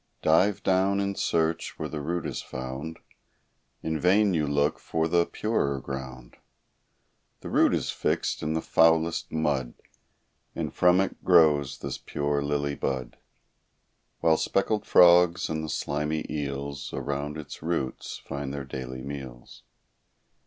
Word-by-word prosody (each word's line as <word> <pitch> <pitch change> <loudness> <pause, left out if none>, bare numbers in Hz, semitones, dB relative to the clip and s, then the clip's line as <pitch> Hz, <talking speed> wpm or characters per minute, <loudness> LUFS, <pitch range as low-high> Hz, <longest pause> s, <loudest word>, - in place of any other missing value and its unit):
Dive 90 +6 +3
down 95 +1 +2
in 100 0 -1
search, 80 -3 -1
where 75 - -3
the 75 -1 -5
root 85 +3 -2
is - - -3
found; 65 +5 -6 0.9
In 80 -1 -1
vain 100 +3 +4
you 75 -3 +1
look 70 +1 +1
for 80 0 -1
the 85 +1 +2
purer 70 -11 -1
ground; 65 -2 -8 1.0
The - - -7
root - - +4
is - - -2
fixed - - -1
in 75 +1 -1
the 80 - -1
foulest 80 0 +3
mud; 70 -6 -1 0.8
And - - -3
from 90 +1 +4
it 95 - -4
grows 75 -6 +4
this - - -5
pure 70 0 -1
lily 70 0 -1
bud; 65 -3 -3 1.1
While 80 -1 +4
speckled 105 +5 0
frogs, 90 0 +6
and 80 0 -2
the 80 - -5
slimy 75 +2 -2
eels, 70 -1 -4
Around 70 +1 -3
its 75 - -9
roots 80 -6 -3
find 70 -1 -4
their 70 -1 -5
daily 65 -1 -6
meals. 65 -4 -8
75 Hz, 140 wpm, -27 LUFS, 70-85 Hz, 1.1 s, frogs